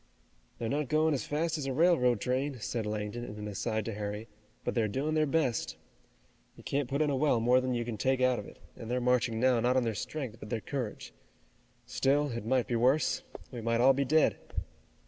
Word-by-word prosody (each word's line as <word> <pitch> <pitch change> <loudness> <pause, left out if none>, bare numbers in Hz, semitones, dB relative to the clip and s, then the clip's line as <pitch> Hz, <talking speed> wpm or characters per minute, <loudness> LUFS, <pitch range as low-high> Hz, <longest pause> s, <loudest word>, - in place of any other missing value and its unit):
"They're 115 - -3
not 145 +3 -1
going 155 0 +3
as 135 - -2
fast 155 +2 -1
as 135 - -3
a 135 - -1
railroad 130 -7 +4
train," 130 +3 -1
said 110 0 -3
Langdon 105 +2 -3
in 105 -3 -7
an 105 0 -5
aside 110 +1 -2
to 115 - -3
Harry, 105 +1 -4 0.4
"but - - -1
they're 115 -3 +1
doing 140 +8 -1
their 155 -1 +2
best. 140 -6 0 0.8
You - - -14
can't 140 -2 -1
put 140 +3 +1
in 150 - +1
a - - +1
well 135 -3 +2
more 125 +3 +4
than 130 -1 -1
you 120 -1 -1
can 115 -2 -4
take 130 +3 +2
out 130 -2 +3
of 105 - -8
it, - - -13 0.2
and 115 - -8
they're 125 +1 0
marching 125 -2 +1
now 125 -1 +4
not 125 +3 +2
on 130 - +3
their 115 -1 -1
strength, 125 +1 -5
but 105 - -9
their 115 - -1
courage. 120 - -5 0.7
Still, 140 +3 +1
it 115 -2 -5
might 130 0 +2
be 120 - -2
worse. 130 +6 +2 0.3
We 120 -3 -6
might 115 +1 +1
all 130 +3 +6
be 140 +1 +1
dead." 155 +3 +3
125 Hz, 225 wpm, -31 LUFS, 115-140 Hz, 0.8 s, all